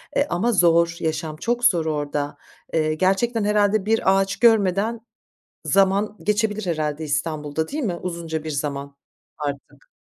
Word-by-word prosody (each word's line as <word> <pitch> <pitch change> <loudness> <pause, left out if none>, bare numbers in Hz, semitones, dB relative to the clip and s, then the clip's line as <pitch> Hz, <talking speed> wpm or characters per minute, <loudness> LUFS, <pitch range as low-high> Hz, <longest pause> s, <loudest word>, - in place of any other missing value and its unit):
E, 285 - +4
ama 230 +2 0
zor, 170 -3 +3
yaşam 160 -1 -2
çok 240 +8 -2
zor 175 -9 +3
orada. 145 -1 -2 0.4
Eee, 155 -1 +1
gerçekten 200 +7 +1
herhâlde 210 -1 +2
bir 215 -3 +3
ağaç 195 +1 0
görmeden 220 -1 +3 0.7
zaman 195 +2 +2
geçebilir 210 -1 0
herhâlde 155 -2 -2
İstanbul'da 155 0 -2
değil 295 +1 -3
mi 180 -5 -1
uzunca 165 -3 -4
bir 155 - -4
zaman 140 -1 -4 0.4
artık? 145 -1 -6
175 Hz, 140 wpm, -22 LUFS, 155-210 Hz, 0.7 s, E